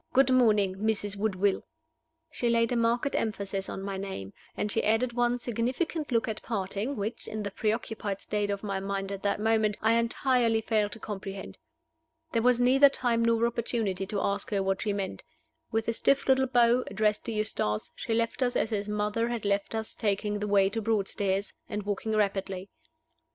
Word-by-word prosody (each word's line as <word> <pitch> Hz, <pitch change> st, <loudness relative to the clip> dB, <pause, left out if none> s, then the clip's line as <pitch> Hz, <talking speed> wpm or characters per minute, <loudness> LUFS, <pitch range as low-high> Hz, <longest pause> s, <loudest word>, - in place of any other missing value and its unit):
Good 265 Hz, 0 st, +5 dB
morning, 210 Hz, -7 st, +4 dB
Mrs. 205 Hz, -1 st, 0 dB
Woodville." 200 Hz, -1 st, +1 dB, 0.7 s
She 240 Hz, -, 0 dB
laid 230 Hz, 0 st, +2 dB
a -, -, +1 dB
marked 235 Hz, +4 st, +1 dB
emphasis 200 Hz, -3 st, -2 dB
on 195 Hz, -, -5 dB
my 195 Hz, -1 st, -3 dB
name, 190 Hz, -, -6 dB, 0.2 s
and 210 Hz, -, -1 dB
she -, -, +1 dB
added 225 Hz, +3 st, +2 dB
one 240 Hz, 0 st, +2 dB
significant 255 Hz, -, -2 dB
look 230 Hz, -2 st, +2 dB
at 215 Hz, -1 st, -4 dB
parting, 205 Hz, +4 st, -2 dB
which 215 Hz, +2 st, -4 dB
(in 215 Hz, 0 st, -4 dB
the 200 Hz, -, -4 dB
preoccupied 215 Hz, -2 st, -2 dB
state 205 Hz, 0 st, -2 dB
of 200 Hz, 0 st, -2 dB
my 195 Hz, -2 st, -2 dB
mind 195 Hz, 0 st, -3 dB
at 195 Hz, -1 st, -5 dB
that 200 Hz, 0 st, 0 dB
moment) 220 Hz, -1 st, +2 dB
I 225 Hz, +1 st, +3 dB
entirely 235 Hz, -1 st, +2 dB
failed 215 Hz, -2 st, +1 dB
to 225 Hz, -, -9 dB
comprehend. 195 Hz, -2 st, -6 dB, 0.7 s
There 230 Hz, -, +1 dB
was 245 Hz, 0 st, +4 dB
neither 265 Hz, +3 st, +6 dB
time 240 Hz, -4 st, 0 dB
nor 230 Hz, 0 st, +3 dB
opportunity 225 Hz, -5 st, -1 dB
to 205 Hz, 0 st, -2 dB
ask 200 Hz, 0 st, -1 dB
her 200 Hz, -2 st, 0 dB
what 195 Hz, 0 st, 0 dB
she 210 Hz, -, 0 dB
meant. 200 Hz, -2 st, -3 dB, 0.5 s
With 225 Hz, 0 st, 0 dB
a 230 Hz, -, +1 dB
stiff 275 Hz, +4 st, +2 dB
little 265 Hz, 0 st, +4 dB
bow, 245 Hz, 0 st, +4 dB
addressed 210 Hz, +1 st, 0 dB
to 230 Hz, -, -3 dB
Eustace, 210 Hz, -, -1 dB
she 225 Hz, -, -2 dB
left 230 Hz, +3 st, -1 dB
us 245 Hz, -1 st, +1 dB
as 220 Hz, -, +1 dB
his 205 Hz, -1 st, -2 dB
mother 210 Hz, +2 st, 0 dB
had 235 Hz, -3 st, -3 dB
left 200 Hz, +2 st, 0 dB
us 220 Hz, 0 st, -2 dB
taking 205 Hz, -1 st, -1 dB
the 210 Hz, -, -2 dB
way 200 Hz, -1 st, +4 dB
to 225 Hz, -, -2 dB
Broadstairs, 200 Hz, -2 st, 0 dB, 0.2 s
and 210 Hz, -1 st, -3 dB
walking 205 Hz, +2 st, -2 dB
rapidly. 195 Hz, -2 st, -1 dB
215 Hz, 190 wpm, -29 LUFS, 200-235 Hz, 0.7 s, neither